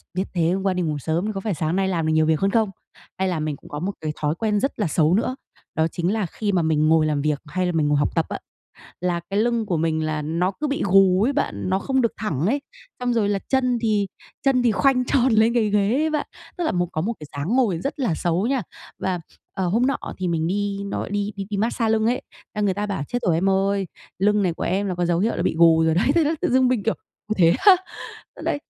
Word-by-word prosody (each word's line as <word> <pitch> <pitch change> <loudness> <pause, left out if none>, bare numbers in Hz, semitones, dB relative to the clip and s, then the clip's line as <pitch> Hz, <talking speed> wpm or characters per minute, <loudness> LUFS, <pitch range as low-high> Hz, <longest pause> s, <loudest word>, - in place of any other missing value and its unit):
"Biết 190 - +1
thế 170 -2 +2
hôm 190 +1 -1
qua 190 -1 +1
đi 180 - -1
ngủ 155 -3 -1
sớm 160 +6 -1
thì 215 - -1
có 195 - -3
phải 205 -1 -2
sáng 160 +1 -1
nay 190 0 +1
làm 165 -4 -1
được 160 - +2
nhiều 155 0 +3
việc 160 -1 +2
hơn 195 0 +1
không?" 220 -3 +2 0.5
Hay 190 - 0
là 175 -4 -1
mình 155 -1 -2
cũng - - -16
có 145 - -5
một 195 +4 -2
cái 155 - -2
thói 150 +2 0
quen 210 0 0
rất 270 -1 -2
là 205 - +1
xấu 155 +1 +2
nữa, 235 +5 +1 0.4
đó 160 0 +2
chính 175 +4 -1
là 215 -3 0
khi 205 +4 -3
mà 180 - +2
mình 155 -1 +2
ngồi 160 -1 +4
làm 150 -2 0
việc, 150 -1 0
hay 180 +5 -2
là 180 - 0
mình 155 -3 +1
ngồi 145 - +2
học 145 +3 0
tập 165 - +2
á, - - -4 0.6
là 180 -1 0
cái 200 - 0
lưng 235 0 +1
của 180 -5 -1
mình 160 0 0
là 155 -1 -2
nó 170 +5 0
cứ 300 +9 -4
bị 280 - -2
gù 190 0 +5
ấy 275 - +1
bạn, 185 - -2
nó 190 +1 +1
không 265 +4 0
được 230 - +1
thẳng 170 -8 -2
ấy, 275 +7 +1 0.4
xong 245 -1 0
rồi 210 -3 +1
là 200 - 0
chân 255 -2 +2
thì 210 -3 +1 0.4
chân 260 -3 +3
thì 235 - +4
khoanh 255 +3 +2
tròn 255 -1 +2
lên 220 +2 +4
cái 220 -3 +2
ghế 205 +1 +2
ấy 310 +4 +1
bạn, 305 -1 -2 0.3
tức 350 - -1
là - - +1
một 175 -1 0
có 155 - -2
một 230 +6 -1
cái 150 - -9
dáng 165 - -1
ngồi 215 -11 +2
rất 275 - -4
là 240 -11 +1
xấu 175 +7 0
nha. 265 -2 +1 0.4
Và, 185 -2 -1 0.3
ờ, 190 -2 -1
hôm 230 +8 +2
nọ 275 - +1 0.2
thì 185 - -2
mình 165 -1 0
đi 200 +1 -1
nó 200 - -3
gọi - - -4
đi 205 0 -1
đi 195 -1 -5
đi 205 - -2
mát-xa 225 +1 0
lưng 220 0 +2
ấy, 245 +2 +1
th - - -22 0.2
là - - 0
người 200 -2 +2
ta 205 +2 -2
bảo 195 -8 -3
"Chết 245 - -2
rồi 165 - +3
em 190 +4 +2
ơi, 195 0 +1 0.3
lưng 210 +1 +3
này 175 -3 +1
của - - -5
em 195 +2 0
là 185 - -2
có 175 - 0
dấu 170 0 +1
hiệu 225 +4 +1
là - - -2
bị - - 0
gù 165 -1 +6
rồi 160 0 +3
đấy." 190 - +2
Thế 335 - +4
là 315 +2 +1
tự - - +1
dưng 260 0 +4
mình, 250 -5 0
kiểu: 225 - +1 0.3
"Ui, 215 - -1
thế 170 -3 +5
á?" 395 -3 +10 0.7
Đấy, - - 0
195 Hz, 285 wpm, -23 LUFS, 165-225 Hz, 0.7 s, á